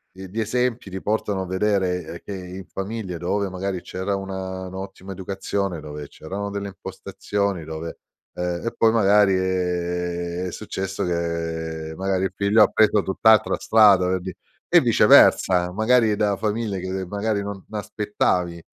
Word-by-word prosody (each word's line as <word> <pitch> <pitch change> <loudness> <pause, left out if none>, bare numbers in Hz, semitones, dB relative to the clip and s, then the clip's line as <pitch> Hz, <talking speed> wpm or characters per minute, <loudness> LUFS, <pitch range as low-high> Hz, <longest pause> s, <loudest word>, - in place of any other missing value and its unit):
i 95 0 -9
gli 105 +5 -4
esempi 120 0 -1
ti 95 0 -5
portano 105 -2 -1
a - - -3
vedere, 95 -2 0
ehm, 85 - -6
che 100 - -6
in 90 0 -8
famiglia 95 -2 -5
dove 95 +4 -1
magari 95 0 -3
c'era 95 +2 -3
una 95 -1 -5
un'ottima 95 +1 -8
educazione, 95 -1 -3
dove 75 -1 -7
c'erano 100 +8 -6
delle 100 0 -4
impostazioni, 100 -1 -4
dove 80 +1 -6 0.4
ehm, 90 -1 -2
e - - -2
poi 115 - +5
magari, 105 -2 +5
ehm, 90 -1 -1
è - - -5
successo 95 -2 -4
che 80 -2 -3
magari 95 0 0
il - - -3
figlio 105 +2 +4
ha - - +5
preso 110 -1 +3
tutt'altra 110 +3 +3
strada 100 -5 +5
per 95 0 0
di' 95 0 -6 0.4
e - - +8
viceversa, 90 -1 +5
magari 110 +2 +3
da 105 -1 +1
famiglie 105 -1 -2
che 95 +1 -4
magari 100 +2 -1
non 100 -2 -6
aspettavi 105 -4 -1
95 Hz, 155 wpm, -23 LUFS, 90-100 Hz, 0.4 s, e